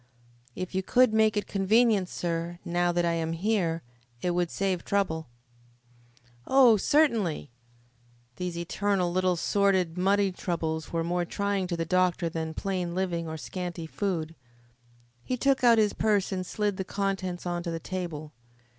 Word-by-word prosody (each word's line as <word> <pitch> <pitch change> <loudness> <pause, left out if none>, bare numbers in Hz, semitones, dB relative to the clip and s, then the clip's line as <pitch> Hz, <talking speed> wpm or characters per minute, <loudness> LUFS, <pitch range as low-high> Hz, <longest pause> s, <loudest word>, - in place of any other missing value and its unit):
"If 185 0 -5
you 190 - +1
could 250 +3 +3
make 220 -1 +3
it 205 - 0
convenient, 205 -1 +2
sir, 170 0 -3
now 175 0 +1
that 175 0 +1
I 170 - +2
am 165 0 -1
here, 170 -3 0 0.4
it 180 - -1
would 175 -1 0
save 190 -2 -1
trouble 160 -8 -1 0.6
" 120 0 -31
"Oh, 260 -4 +6
certainly!" 215 - +1 0.9
These 180 -2 -4
eternal 185 +1 0
little 185 0 +2
sordid 185 -1 +1
money 195 +1 +3
troubles 160 -3 -3
were 165 -1 0
more 175 +1 0
trying 200 +1 -1
to 175 -1 -3
the 165 - -1
doctor 180 0 +1
than 160 -1 -4
plain 180 -3 -2
living 175 -3 -1
or 160 0 -5
scanty 175 +1 -5
food. 165 -2 -2 0.9
He 255 - -2
took 270 +1 +2
out 235 -2 +6
his 210 -2 +3
purse 205 -3 +1
and 185 -1 -2
slid 205 -2 -1
the 190 - -2
contents 190 -2 -3
on 175 -1 -2
to 170 - -4
the 165 0 -3
table. 160 -4 -5
180 Hz, 160 wpm, -28 LUFS, 170-200 Hz, 0.9 s, Oh